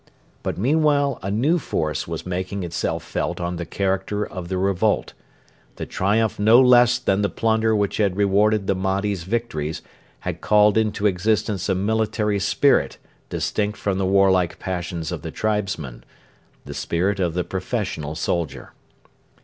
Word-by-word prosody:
But - - -3
meanwhile 145 - +2
a 95 - -4
new 135 - +2
force 75 - -2
was - - -5
making 90 +2 -3
itself 85 -1 -2
felt - - -3
on 85 0 -3
the 85 - -5
character 100 +2 -1
of 90 -2 -7
the 95 +1 -2
revolt. 100 +2 0 0.6
The - - -5
triumph 105 +3 0
no 110 +4 +6
less 125 -1 +6
than 105 -5 0
the 100 - +1
plunder 110 -1 +1
which 100 -1 0
had 100 -3 +1
rewarded 105 +1 +2
the 100 - +2
Mahdi's 95 -1 -1
victories 90 -8 -3 0.4
had - - -5
called 105 -1 +4
into 110 -2 0
existence 105 +1 0
a 95 - +2
military 105 +1 0
spirit 135 +8 +2 0.3
distinct 105 0 -2
from 100 -2 -1
the 95 - +1
warlike 95 -3 +3
passions 85 -3 -4
of - - -4
the - - -6
tribesmen 100 - -3 0.6
the - - -7
spirit 95 +4 -1
of 85 -3 0
the 90 - 0
professional 75 -2 -3
soldier. 85 -1 -3
100 Hz, 150 wpm, -22 LUFS, 90-110 Hz, 0.6 s, no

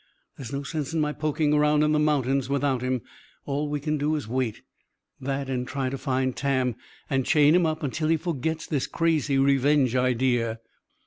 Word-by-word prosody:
There's 125 -4 -8
no 140 0 -3
sense 155 +1 -4
in - - +1
my 150 -1 0
poking 150 0 0
around 150 0 +3
in 150 - +2
the 155 - +2
mountains 140 -3 +1
without 140 -2 0
him. 130 -2 -1 0.4
All 145 +1 -2
we 145 0 -2
can 150 +1 -2
do 150 +2 +1
is 145 -7 -4
wait. 125 -2 -2 0.6
That 135 +1 -3
and 125 -1 -2
try 135 -1 -2
to 135 - -3
find 130 -2 -1
Tam 130 -3 0 0.3
and 135 -1 0
chain 150 +3 +4
him 175 -1 +4
up 155 -1 -2
till 155 0 -1
he 165 +1 +3
forgets 160 -1 -3
this 145 -5 -1
crazy 155 -4 +1
revenge 135 -1 +3
idea." 120 -2 +1
140 Hz, 190 wpm, -26 LUFS, 130-150 Hz, 0.6 s, chain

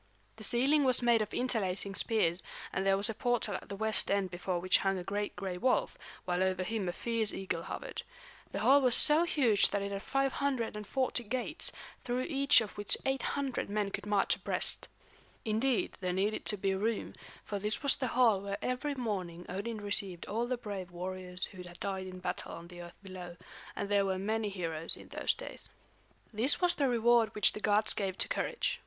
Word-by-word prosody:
The 220 - -10
ceiling 270 +7 +3
was 255 -2 +3
made 235 -2 +4
of 210 -1 -3
interlacing 200 -6 -1
spears, 185 -5 +1 0.3
and 190 - 0
there 195 0 +3
was 200 +2 -1
a 225 - -3
portal 240 -2 0
at - - -6
the 200 - -4
west 220 +1 +4
end 195 -2 +1
before 180 +1 -2
which 185 +2 +3
hung 195 -1 0
a 180 - -4
great 205 +2 -3
gray 185 -2 -4
wolf, 255 +4 +1 0.3
while 180 0 0
over 185 -1 +1
him 205 -2 -2
a - - 0
fierce 225 +2 +1
eagle 185 -3 -3
hovered. - - -6 0.5
The - - -3
hall 280 +2 +6
was 250 -3 +5
so 310 +3 +5
huge 240 -11 +4
that 200 -1 -1
it 200 - -4
had 195 0 -3
540 260 -3 -1
gates, 245 +3 -2 0.3
through 245 +1 -1
each 275 -3 +4
of 215 - -5
which 205 - +3
800 270 -1 -1
men 205 -1 -1
could - - -5
march 205 -1 +2
abreast. - - +1 0.6
Indeed, 225 +3 0
there 180 -1 -1
needed 200 +4 -1
to 210 - +2
be 195 0 0
room, 215 +3 -2 0.3
for 205 - -3
this 210 +6 -1
was 280 - +4
the 260 - -2
hall 225 -6 +5
where 200 0 -4
every 265 +3 -2
morning 185 -8 -4
Odin 210 +5 -4
received 200 -3 0
all 230 +3 -2
the 255 0 -1
brave 200 -6 -6
warriors 180 +1 -3
who 185 -2 -11
had 175 -1 -11
died 190 -1 -3
in 185 0 -8
battle 180 0 -4
on 170 +1 -9
the 175 -1 -10
earth 175 0 -11
below; 180 -2 -8 0.4
and 200 - -3
there 200 -1 +2
were 190 -1 0
many 215 +2 -1
heroes 165 -4 -3
in - - -13
those - - 0
days. - - -6 0.6
This 240 +7 +3
was 355 -1 +3
the 275 -3 +1
reward 235 -1 +3
which 210 - +4
the - - -6
gods 210 0 +3
gave 195 -2 -3
to - - 0
courage. 485 - -1
205 Hz, 200 wpm, -32 LUFS, 190-240 Hz, 0.6 s, hall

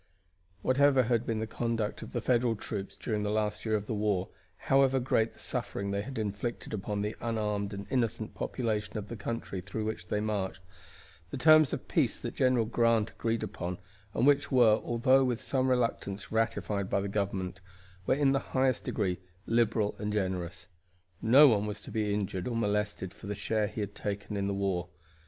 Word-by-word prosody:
Whatever 135 0 +4
had 120 0 0
been 115 - 0
the 110 - -1
conduct 115 -1 -2
of - - -8
the - - -2
Federal 120 -2 +2
troops 100 -2 -5
during 105 -3 -2
the 105 - -1
last 105 0 -1
year 110 - +2
of 105 -1 -2
the 110 - -3
war, 105 -3 0 0.3
however 135 -1 +3
great 115 -3 +1
the - - -20
suffering 100 0 -2
they 100 0 0
had 135 +5 -7
inflicted 110 +3 -3
upon 105 0 -2
the 105 - -2
unarmed 105 -3 -1
and 100 0 -6
innocent 115 -4 -1
population 110 -4 -2
of 105 -1 -5
the 120 - -5
country 105 -3 -4
through 100 +4 -4
which 110 -5 -4
they 105 - 0
marched, 105 -4 -2 0.7
the - - -5
terms 155 +1 +6
of - - -4
peace - - +2
that - - -5
General 125 -3 +3
Grant 115 -1 +2
agreed 115 -1 -1
upon, 90 +1 -4 0.4
and 120 - +2
which 145 0 +4
were, 120 -5 +5
although 130 +3 +4
with 125 -3 0
some 130 -1 0
reluctance, 115 -5 -1
ratified 110 -3 0
by - - +2
the 100 - -2
government, 95 -2 -2 0.5
were - - +4
in 140 -1 +3
the 135 - +2
highest 130 -2 0
degree 90 -4 -1 0.3
liberal 110 -2 +2
and 105 0 -2
generous. 95 -3 -2 0.6
No 135 +7 +8
one 105 -4 +3
was 105 0 -4
to - - -9
be 105 -2 0
injured 100 -2 -2
or 120 - -2
molested 105 -3 -1
for 105 - -11
the 105 - -2
share 110 +1 0
he 105 +1 -5
had 100 0 -4
taken 100 0 -4
in 100 -1 -1
the 100 - -1
war. 95 -3 -1
110 Hz, 190 wpm, -30 LUFS, 100-120 Hz, 0.7 s, No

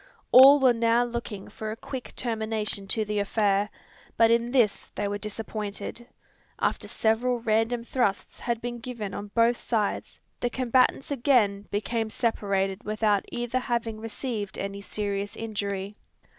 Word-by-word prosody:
All 275 +3 +10
were 260 -2 +5
now 230 +1 +3
looking 235 -4 -5
for 215 - -6
a 215 - -3
quick 255 +1 -7
termination 220 -4 -2
to 220 +2 0
the 210 0 -1
affair; 205 0 +1 0.5
but 230 0 +5
in 235 +1 +2
this 240 -6 +2
they 205 - -1
were 205 0 -3
disappointed. 215 +2 -5 0.5
After - - -1
several 240 +3 +1
random 225 +1 +1
thrusts 235 -5 -1
had 235 -1 -2
been 240 0 -4
given 225 -4 -5
on 205 +1 -5
both 235 +1 +4
sides, 215 -4 -2 0.2
the 245 - 0
combatants 255 +3 +2
again 235 -7 +2
became 220 +2 -1
separated 195 -4 -1
without 215 -1 +1
either 240 +1 -1
having 235 -3 -2
received 220 -2 -4
any 200 0 -4
serious 200 0 -3
injury. 200 -2 -3
225 Hz, 145 wpm, -27 LUFS, 205-240 Hz, 0.5 s, All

